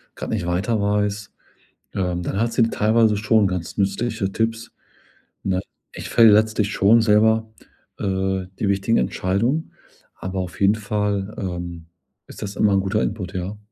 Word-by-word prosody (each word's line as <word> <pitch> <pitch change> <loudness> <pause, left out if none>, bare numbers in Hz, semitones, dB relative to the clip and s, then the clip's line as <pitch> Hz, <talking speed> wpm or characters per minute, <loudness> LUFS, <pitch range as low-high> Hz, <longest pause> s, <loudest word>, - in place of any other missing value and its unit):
grad - - -6
nicht 105 -6 -2
weiter 100 +5 0
weiß, 105 0 -1 0.6
ähm, 90 -2 -1
dann 95 - -3
hat 115 +1 0
sie 115 - +2
teilweise 110 0 +2
schon 110 0 +3
ganz 90 -3 -4
nützliche 100 +1 -1
Tipps. 115 +1 -2 0.7
Na, 95 -1 0 0.3
ich - - -7
fälle 115 -2 +7
letztlich 110 0 +2
schon 110 +4 +4
selber, 110 +1 +3 0.5
äh, 95 -1 -1
die 100 - 0
wichtigen 100 +4 +1
Entscheidungen, 100 - 0 0.4
aber 95 0 -5
auf 90 -2 -5
jeden 100 +2 +5
Fall, 105 -1 -2
ähm, 85 -3 -5 0.4
ist - - -12
das 100 -1 -5
immer 105 -2 +3
'n 95 - +3
guter 100 +3 0
Input, 95 -3 -4
ja. 95 +3 -4
100 Hz, 155 wpm, -22 LUFS, 95-110 Hz, 0.7 s, fälle